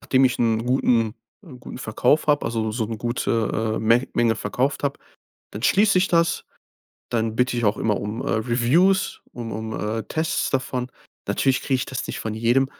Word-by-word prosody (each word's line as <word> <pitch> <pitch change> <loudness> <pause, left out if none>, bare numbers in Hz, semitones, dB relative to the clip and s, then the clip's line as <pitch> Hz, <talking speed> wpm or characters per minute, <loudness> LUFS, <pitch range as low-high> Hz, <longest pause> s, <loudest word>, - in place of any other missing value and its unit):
nachdem 130 0 +3
ich 125 - +2
'n 115 -1 +1
guten 120 -3 +2 0.3
'n 130 -7 -12
guten - - -9
Verkauf 125 +7 +1
habe, 145 -4 +3
also 110 -1 -1
so 110 -2 -1
'ne 115 0 -4
gute, 115 -1 -1
äh, - - -1
Men 115 +4 +3
Menge 115 -1 +2
verkauft 135 +4 -1
habe, 140 -1 -1 0.5
dann 105 - -7
schließ 200 +5 +4
ich 185 +1 +4
das. 170 -1 +2 0.7
Dann 110 -2 0
bitte 125 0 +1
ich 120 - -1
auch 105 +1 +2
immer 105 -2 +1
um, 105 +4 -4
äh, - - -2
Reviews, 125 - +2
um 115 -2 -6
um, 110 +1 -5 0.3
äh, 110 - -4
Tests 160 0 -1
davon. 130 -1 -2 0.4
Natürlich 135 -1 +1
kriege 135 - 0
ich 125 - -2
das 130 - -4
nicht - - -5
von 110 - -3
jedem. 120 +4 +2
120 Hz, 190 wpm, -23 LUFS, 110-135 Hz, 0.7 s, schließ